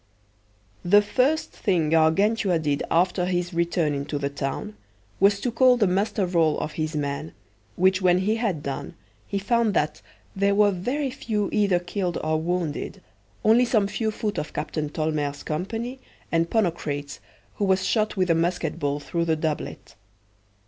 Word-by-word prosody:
The 205 Hz, +4 st, +5 dB
first 270 Hz, +9 st, +1 dB
thing 170 Hz, -7 st, 0 dB
Gargantua 180 Hz, +4 st, +3 dB
did 145 Hz, -3 st, -1 dB
after 180 Hz, +1 st, +2 dB
his 175 Hz, 0 st, -1 dB
return 170 Hz, -2 st, +1 dB
into 140 Hz, +1 st, -3 dB
the 140 Hz, 0 st, -2 dB
town 135 Hz, -6 st, -4 dB, 0.4 s
was 200 Hz, +1 st, +4 dB
to 245 Hz, -, -1 dB
call 250 Hz, +1 st, +5 dB
the 220 Hz, -, +3 dB
muster 195 Hz, +2 st, +1 dB
roll 165 Hz, -4 st, +2 dB
of -, -, -3 dB
his 155 Hz, 0 st, -3 dB
men, 145 Hz, +1 st, -3 dB, 0.4 s
which 185 Hz, +1 st, +3 dB
when 180 Hz, -1 st, +4 dB
he 210 Hz, +4 st, +1 dB
had 195 Hz, -10 st, -1 dB
done, 140 Hz, +4 st, -5 dB, 0.3 s
he 200 Hz, -, -2 dB
found 220 Hz, 0 st, +1 dB
that 150 Hz, -1 st, 0 dB, 0.3 s
there 200 Hz, +1 st, +2 dB
were 205 Hz, 0 st, +5 dB
very 255 Hz, +10 st, -2 dB
few 220 Hz, -7 st, -2 dB
either 200 Hz, -4 st, +3 dB
killed 175 Hz, 0 st, -3 dB
or 155 Hz, 0 st, 0 dB
wounded, 170 Hz, -3 st, -2 dB, 0.5 s
only 225 Hz, +3 st, +6 dB
some 220 Hz, -4 st, +2 dB
few 220 Hz, +2 st, -1 dB
foot 210 Hz, -1 st, -2 dB
of 150 Hz, -, -6 dB
Captain 150 Hz, 0 st, -3 dB
Tolmere's 150 Hz, -2 st, -2 dB
company, 225 Hz, +11 st, -4 dB, 0.3 s
and 165 Hz, 0 st, +1 dB
Ponocrates, 150 Hz, -9 st, -1 dB, 0.4 s
who 205 Hz, -, +1 dB
was 190 Hz, -1 st, +2 dB
shot 215 Hz, -2 st, 0 dB
with 185 Hz, -2 st, +2 dB
a -, -, +6 dB
musket 165 Hz, -1 st, -1 dB
ball 145 Hz, 0 st, -1 dB
through 170 Hz, +3 st, -2 dB
the 160 Hz, -1 st, +2 dB
doublet. 155 Hz, -1 st, -4 dB
180 Hz, 160 wpm, -25 LUFS, 155-205 Hz, 0.5 s, only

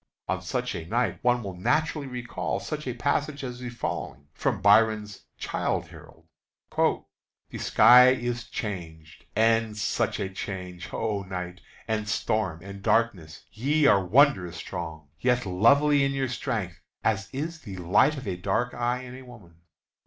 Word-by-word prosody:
On -, -, -1 dB
such -, -, -2 dB
a 85 Hz, -, -5 dB
night 115 Hz, -2 st, 0 dB
one 125 Hz, -1 st, +2 dB
will 95 Hz, -2 st, -6 dB
naturally 150 Hz, -, 0 dB
recall 125 Hz, -2 st, -3 dB
such 150 Hz, -2 st, -5 dB
passages 140 Hz, -1 st, -1 dB
as -, -, -13 dB
the 125 Hz, -1 st, -5 dB
following, 75 Hz, -11 st, -5 dB
from -, -, -1 dB
Byron's 105 Hz, 0 st, +3 dB
"Childe -, -, -2 dB
Harold:" 80 Hz, 0 st, -15 dB, 1.3 s
"The -, -, -6 dB
sky 125 Hz, +1 st, +7 dB
is 120 Hz, -2 st, -1 dB
changed, 80 Hz, -6 st, -7 dB
and 115 Hz, -1 st, +2 dB
such 100 Hz, -, -1 dB
a 100 Hz, -, -1 dB
change! 95 Hz, -2 st, -6 dB
oh, 105 Hz, -3 st, -2 dB
night, 90 Hz, -1 st, -6 dB, 0.3 s
And 110 Hz, -1 st, -2 dB
storm, 95 Hz, -6 st, -1 dB
and 100 Hz, 0 st, -9 dB
darkness, 95 Hz, -9 st, 0 dB
ye 145 Hz, +7 st, +1 dB
are 100 Hz, -8 st, +5 dB
wondrous 95 Hz, -, +3 dB
strong, 80 Hz, -3 st, -6 dB
Yet 125 Hz, -1 st, +1 dB
lovely 140 Hz, +10 st, +4 dB
in 140 Hz, 0 st, +1 dB
your 135 Hz, -2 st, -1 dB
strength, 100 Hz, -7 st, -3 dB, 0.2 s
as 100 Hz, -2 st, 0 dB
is 160 Hz, +5 st, -4 dB
the 100 Hz, -9 st, -9 dB
light 95 Hz, -, +3 dB
Of 130 Hz, -, -7 dB
a 95 Hz, -, -1 dB
dark 100 Hz, +7 st, -1 dB
eye 120 Hz, +1 st, -1 dB
in 130 Hz, +1 st, -9 dB
woman! 100 Hz, -9 st, -15 dB
110 Hz, 150 wpm, -27 LUFS, 95-125 Hz, 1.3 s, sky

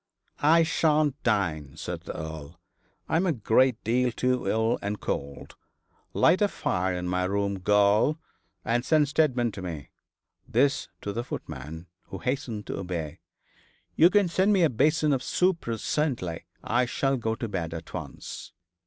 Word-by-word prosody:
'I 165 Hz, +3 st, +5 dB
shan't 150 Hz, -3 st, +1 dB
dine,' 80 Hz, -, -1 dB
said -, -, -5 dB
the -, -, -7 dB
Earl. 80 Hz, +1 st, -7 dB, 0.5 s
'I -, -, +1 dB
am 180 Hz, -, +1 dB
a -, -, +3 dB
great 120 Hz, 0 st, +2 dB
deal 125 Hz, +2 st, +1 dB
too 125 Hz, -2 st, 0 dB
ill 110 Hz, +3 st, +1 dB
and 100 Hz, +1 st, -3 dB
cold. 70 Hz, 0 st, -5 dB, 0.6 s
Light 185 Hz, -, +3 dB
a 205 Hz, -, +5 dB
fire 90 Hz, -, -1 dB
in 90 Hz, 0 st, -3 dB
my 90 Hz, +1 st, 0 dB
room, 100 Hz, 0 st, -1 dB
girl, 105 Hz, -, +3 dB, 0.5 s
and 120 Hz, 0 st, +1 dB
send 150 Hz, -2 st, +3 dB
Steadman 130 Hz, -6 st, +2 dB
to 100 Hz, -, -8 dB
me' 80 Hz, -6 st, -6 dB, 0.6 s
this 135 Hz, +4 st, +2 dB, 0.2 s
to 100 Hz, -, -3 dB
the 120 Hz, -, -2 dB
footman, 80 Hz, -, -7 dB, 0.2 s
who 95 Hz, -, -7 dB
hastened 125 Hz, -2 st, -3 dB
to -, -, -4 dB
obey. 85 Hz, -5 st, -4 dB, 0.8 s
'You 170 Hz, -, +7 dB
can 205 Hz, -1 st, +3 dB
send 190 Hz, +4 st, +2 dB
me 190 Hz, -3 st, +4 dB
up 160 Hz, -, +3 dB
a -, -, -12 dB
basin 150 Hz, +4 st, +3 dB
of 130 Hz, -, 0 dB
soup 180 Hz, +4 st, +1 dB
presently. 115 Hz, -, -2 dB, 0.2 s
I 120 Hz, +2 st, +1 dB
shall 135 Hz, +2 st, 0 dB
go 110 Hz, -3 st, -1 dB
to 115 Hz, -, -4 dB
bed 90 Hz, -6 st, -3 dB
at 80 Hz, 0 st, -8 dB
once.' -, -, -7 dB
115 Hz, 165 wpm, -27 LUFS, 90-145 Hz, 0.8 s, You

